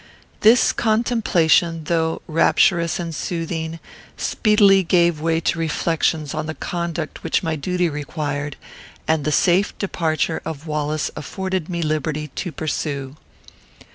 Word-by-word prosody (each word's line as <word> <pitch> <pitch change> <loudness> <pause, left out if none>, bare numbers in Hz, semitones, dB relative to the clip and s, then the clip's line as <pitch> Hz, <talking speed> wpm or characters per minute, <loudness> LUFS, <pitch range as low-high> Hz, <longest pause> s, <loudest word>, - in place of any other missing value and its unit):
This 225 +3 +5
contemplation, 205 -8 +2
though 160 0 -1
rapturous 170 +2 +3
and 170 -1 -4
soothing, 165 0 -3 0.4
speedily 205 -3 +4
gave 170 -3 +2
way 165 0 +1
to 170 - 0
reflections 160 -2 0
on 155 0 -3
the 155 - -4
conduct 170 -2 -4
which - - 0
my 160 -2 -1
duty 180 +4 0
required, 145 -1 -4 0.5
and 160 -2 +1
the 150 - +1
safe 185 +5 +2
departure 160 -4 -1
of 160 -1 -6
Wallace 150 0 -2
afforded 190 +2 -3
me 170 -1 -2
liberty, 155 0 -2
to 175 +6 -5
pursue. 140 -2 -3
165 Hz, 125 wpm, -21 LUFS, 155-175 Hz, 0.5 s, This